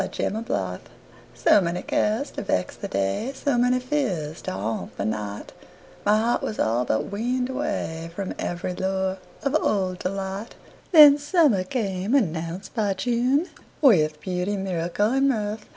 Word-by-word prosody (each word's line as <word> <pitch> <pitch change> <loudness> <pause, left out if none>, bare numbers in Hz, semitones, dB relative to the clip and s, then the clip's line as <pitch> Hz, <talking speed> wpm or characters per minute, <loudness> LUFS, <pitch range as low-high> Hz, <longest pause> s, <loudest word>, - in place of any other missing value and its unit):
Summer 190 - -2
Magic 100 - -3 0.6
SO 205 - +5
many 175 +1 -2
cares 220 +7 0
to - - -5
vex 90 - -1
the - - -6
day, 100 - -1
So 280 0 0
many 250 +1 +3
fears 210 - -2
to - - -4
haunt 105 +4 -4
the - - -2
night, 105 -1 -4 0.5
My 210 +1 +4
heart 230 +2 +1
was 215 - -4
all 120 +3 +1
but 110 - -1
weaned 250 +5 -1
awayFrom 195 - -3
every 175 +1 -3
lure 190 0 -1 0.2
of 275 +1 0
old 185 -3 0
delight. 195 +3 -4 0.4
Then 295 -4 +9
summer 290 - +3
came, 195 0 -1
announced 170 - -1
by 205 -4 0
June, 250 - +1 0.3
With 155 - +4
beauty, 185 +2 -2
miracle 190 +2 -1
and 270 +1 +3
mirth. 215 -3 -2
195 Hz, 150 wpm, -24 LUFS, 170-250 Hz, 0.6 s, Then